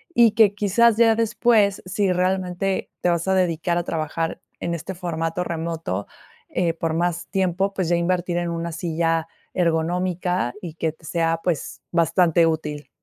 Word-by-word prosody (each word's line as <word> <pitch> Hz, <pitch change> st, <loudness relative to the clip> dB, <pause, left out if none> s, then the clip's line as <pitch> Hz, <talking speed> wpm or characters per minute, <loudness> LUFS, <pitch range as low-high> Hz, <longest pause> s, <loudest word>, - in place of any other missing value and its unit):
Y 235 Hz, -2 st, +6 dB
que, 210 Hz, -3 st, +4 dB
quizás, 215 Hz, +3 st, +3 dB
ya 225 Hz, -1 st, +5 dB
después, 220 Hz, -2 st, +2 dB
si 190 Hz, +1 st, 0 dB
realmente 185 Hz, +1 st, -1 dB
te 180 Hz, -, +2 dB
vas 170 Hz, +1 st, 0 dB
a 190 Hz, -, +3 dB
dedicar 170 Hz, -1 st, +1 dB
a 175 Hz, -, 0 dB
trabajar 165 Hz, 0 st, -3 dB, 0.2 s
en 170 Hz, -, -2 dB
este 170 Hz, +3 st, -5 dB
formato 170 Hz, -1 st, -2 dB
remoto, 165 Hz, -, -3 dB, 0.4 s
eh, 170 Hz, -2 st, 0 dB
por 165 Hz, -1 st, -2 dB
más 175 Hz, +1 st, -1 dB
tiempo, 190 Hz, 0 st, 0 dB
pues 185 Hz, -4 st, -1 dB
ya 175 Hz, -, +3 dB
invertir 175 Hz, 0 st, 0 dB
en 175 Hz, -1 st, -1 dB
una 170 Hz, 0 st, -3 dB
silla 165 Hz, 0 st, -1 dB, 0.3 s
ergonómica 175 Hz, -3 st, 0 dB
y 170 Hz, -3 st, -6 dB
que 160 Hz, -1 st, -1 dB
te 160 Hz, -, -19 dB
sea, 165 Hz, -1 st, 0 dB
pues, 170 Hz, -5 st, -2 dB
bastante 170 Hz, 0 st, +3 dB
útil. 150 Hz, -2 st, -3 dB
175 Hz, 160 wpm, -23 LUFS, 165-185 Hz, 0.4 s, Y